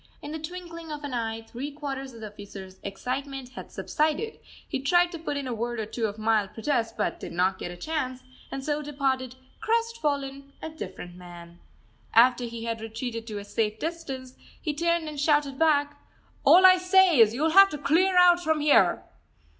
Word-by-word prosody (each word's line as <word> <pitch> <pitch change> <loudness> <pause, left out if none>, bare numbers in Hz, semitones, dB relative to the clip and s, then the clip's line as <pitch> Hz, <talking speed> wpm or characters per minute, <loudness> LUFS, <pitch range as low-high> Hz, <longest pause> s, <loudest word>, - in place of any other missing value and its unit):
In 290 - -8
the 315 - -4
twinkling 335 0 -8
of 300 -1 -6
an 285 -3 -5
eye 225 -1 -3
three 250 +5 -6
quarters 275 -2 -6
of 230 -2 -12
the 215 - -6
officer's 195 -2 -11
excitement 260 +6 -5
had 260 - -10
subsided; 310 +8 -1 0.3
he - - -2
tried 350 +6 +3
to 335 - -7
put 295 -3 -3
in 280 - -3
a 250 - -3
word 235 +1 -3
or 220 - -2
two 220 +1 -2
of 205 0 -7
mild 215 -2 +1
protest 230 -2 -1
but 210 - -1
did - - -7
not 185 +2 +1
get - - -5
a 175 - -8
chance, 260 - -3 0.3
and 270 0 -5
so 300 0 -1
departed 265 -3 -2 0.2
crestfallen, 295 -13 -1
a 320 - -6
different 180 - -8
man. 175 -1 -12 0.6
After 245 +1 +5
he 230 -1 -6
had 230 -1 -3
retreated 225 +1 -5
to 215 -2 -5
a 200 - -7
safe 215 +1 -1
distance, 270 -6 -5 0.3
he 305 - -2
turned 335 +1 0
and 300 -2 -6
shouted 290 -2 +1
back: 290 -2 +2 0.4
"All 370 +2 +7
I 370 0 +9
say 365 -4 +5
is, 225 0 +6
you'll 315 +5 +1
have 390 +3 +8
to 300 - -5
clear 360 +6 +2
out 355 -1 +6
from 315 -1 +1
here!" 280 -12 +4
275 Hz, 195 wpm, -27 LUFS, 225-315 Hz, 0.6 s, I